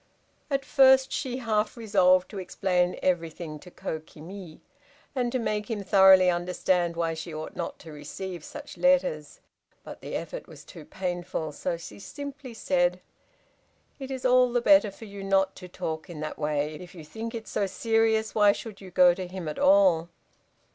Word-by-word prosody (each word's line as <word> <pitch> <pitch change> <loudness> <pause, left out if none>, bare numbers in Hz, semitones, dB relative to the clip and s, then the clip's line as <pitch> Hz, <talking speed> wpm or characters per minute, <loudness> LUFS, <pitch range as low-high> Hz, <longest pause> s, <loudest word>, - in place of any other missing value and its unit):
At 275 -2 -1
first, 265 -1 +5
she 255 -3 -3
half 220 -2 -1
resolved 185 -5 +3
to 205 - -6
explain 180 -1 0
everything 165 -3 -2
to 180 - -13
Kokimi, 160 +2 -8 0.5
and 250 -3 -1
to 255 - 0
make 210 -3 -2
him 215 -3 -3
thoroughly 190 -2 +7
understand 175 0 0
why 165 -1 -1
she 160 +1 -7
ought 155 0 -7
not - - -4
to 160 - -11
receive 175 +3 -7
such 295 - -10
letters, 265 - +1 0.4
but - - -10
the - - -6
effort - - -5
was - - -13
too - - -12
painful, 175 -4 -4
so 170 +3 -3
she 105 -11 -11
simply 280 - -8
said, 180 -4 +1 1.0
"It 270 -1 -7
is 260 -1 -5
all 250 -1 +5
the 245 - +2
better 290 -3 +5
for 200 +3 -12
you 200 -1 -9
not 195 0 +2
to 180 - -9
talk 160 -1 -5
in 165 -3 -8
that 155 - -5
way. 150 0 -1
If 180 0 -12
you 160 -3 -10
think 225 +7 -6
it 225 -1 -7
so 200 - -1
serious 225 +2 +1
why 205 -2 +5
should 210 -2 -9
you 190 - -10
go 180 0 +5
to 185 0 -6
him 180 -2 -7
at 150 - -5
all?" 185 -4 +4
190 Hz, 175 wpm, -27 LUFS, 170-225 Hz, 1.0 s, thoroughly